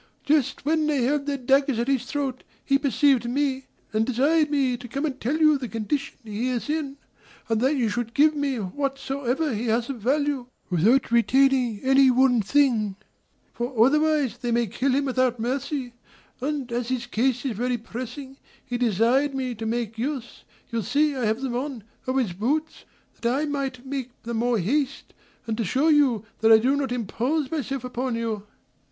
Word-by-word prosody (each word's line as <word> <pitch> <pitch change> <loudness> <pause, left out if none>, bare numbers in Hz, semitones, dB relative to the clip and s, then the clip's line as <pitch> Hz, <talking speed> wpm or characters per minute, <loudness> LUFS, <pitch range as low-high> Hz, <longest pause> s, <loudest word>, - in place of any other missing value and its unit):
Just 285 -2 +1
when 310 0 +2
they 285 -5 +1
held 285 +3 0
their 285 -1 0
daggers 270 0 +2
at 235 +2 -1
his 260 -3 0
throat, 275 -3 -3 0.2
he 275 0 +3
perceived 275 -3 +2
me, 270 0 -1 0.3
and 215 +1 +2
desired 290 +6 +2
me 275 -4 +1
to 245 0 -9
come 275 +5 -2
and 270 -3 -4
tell 270 +7 0
you 305 -3 +4
the 255 - -4
condition 230 +6 -3
he 225 +3 -3
is 250 +4 -2
in, 290 -3 -3 0.5
and 225 -1 +1
that 270 +4 +2
you 245 -5 +1
should 235 +1 -3
give 305 +1 +5
me 285 -2 -1
whatsoever 270 - -2
he 225 +3 -2
has 230 +3 0
of 245 -5 -8
value, 280 +1 0 0.2
without 225 +10 +3
retaining 250 -2 +3
any 270 0 +5
one 250 -2 +4
thing; 225 -4 +2 0.6
for 240 0 -4
otherwise 300 -3 +2
they 245 -1 -3
will 235 0 +2
kill 255 +6 -1
him 280 +1 +1
without 255 -2 +1
mercy; 260 +1 -2 0.5
and, 275 -2 -3
as 240 0 -2
his 250 -2 -1
case 245 +2 0
is 250 -5 -1
very 245 +3 -1
pressing, 255 +4 -8 0.3
he 245 -1 -3
desired 245 +5 +2
me 260 -2 -2
to 225 0 -5
make 225 -1 -3
use 260 -1 -4 0.3
(you 230 -1 -1
see 290 +7 +1
I 255 -3 -1
have 220 +4 0
them 260 -3 -2
on) 255 -3 -4 0.2
of 260 +1 0
his 230 -9 0
boots, 290 - -2 0.4
that 235 - +1
I 280 +4 0
might 270 -3 -3
make 265 -2 -4
the 235 0 -4
more 235 +1 +1
haste, 275 - -1 0.3
and 225 - -2
to - - +1
shew 270 - +2
you 260 -8 +3
that 225 0 +4
I 220 - +10
do 255 +5 +2
not 275 -3 -2
impose 250 +5 -1 0.2
upon 250 -2 -3
you." 220 -3 -3
255 Hz, 185 wpm, -25 LUFS, 235-280 Hz, 0.6 s, I